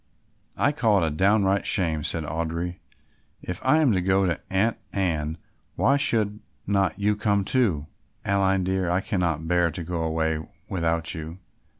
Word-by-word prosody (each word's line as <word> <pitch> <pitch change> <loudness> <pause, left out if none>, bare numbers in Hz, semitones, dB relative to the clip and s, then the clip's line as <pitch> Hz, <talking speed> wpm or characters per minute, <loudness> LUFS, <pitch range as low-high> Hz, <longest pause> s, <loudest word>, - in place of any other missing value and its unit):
"I 145 - +3
call 110 - +2
it - - +2
a - - -1
downright 100 +4 +2
shame," 80 -6 +2
said 80 +1 0
Audry. 85 +3 -3 0.6
"If 90 - -5
I 130 +4 +4
am 155 -6 +4
to 95 -3 +1
go 95 +1 +2
to 85 -2 -1
Aunt 100 +5 +1
Anne, 80 -5 -1 0.4
why 140 - +3
should 105 -6 +1 0.3
not 100 -4 +1
you 105 +1 +1
come 100 -2 +1
too? 95 - +1 0.4
Aline, 95 -1 +2
dear, 95 -1 0
I 90 +2 +1
cannot 85 -7 -1
bear 90 0 +3
to 85 +2 -6
go 85 0 -3
away 80 -1 0 0.3
without 85 -3 -1
you. 80 +2 -7
90 Hz, 165 wpm, -25 LUFS, 80-100 Hz, 0.6 s, I